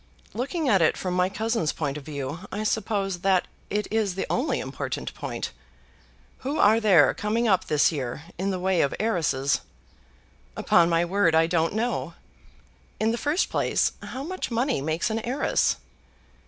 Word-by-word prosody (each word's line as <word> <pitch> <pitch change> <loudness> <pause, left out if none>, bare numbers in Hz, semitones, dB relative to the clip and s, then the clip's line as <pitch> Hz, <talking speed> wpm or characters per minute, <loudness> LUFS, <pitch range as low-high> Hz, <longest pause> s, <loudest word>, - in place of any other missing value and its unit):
"Looking 280 - -2
at 195 -7 +4
it 160 - +3
from 185 -1 -3
my 180 0 +2
cousin's 220 -5 -1
point 145 -3 -3
of 150 - -7
view, 145 +1 -5
I 210 +2 -3
suppose 200 -4 -1
that 190 0 +2 0.2
it 210 +1 -1
is 215 -4 0
the 190 - -2
only 265 +1 0
important 135 +1 -4
point. - - -5 0.9
Who 280 +4 -3
are 220 +2 +5
there 195 -9 +5
coming 225 +3 0
up 190 -4 +3
this 150 +1 +3
year, 140 -1 -4 0.2
in 195 +1 0
the 190 - -1
way 185 -1 +2
of 140 - 0
heiresses?" 160 -10 +1 1.0
"Upon 170 0 +4
my 170 0 +2
word 175 -2 +2
I 160 0 +5
don't 165 +2 0
know. 235 +3 -2 0.8
In 220 +1 +2
the 235 - -1
first 300 +5 0
place, - - +1
how 265 - -6
much 370 +5 -4
money 240 - 0
makes 160 +8 -1
an 220 - 0
heiress?" 245 +5 +1
195 Hz, 165 wpm, -25 LUFS, 165-225 Hz, 1.0 s, are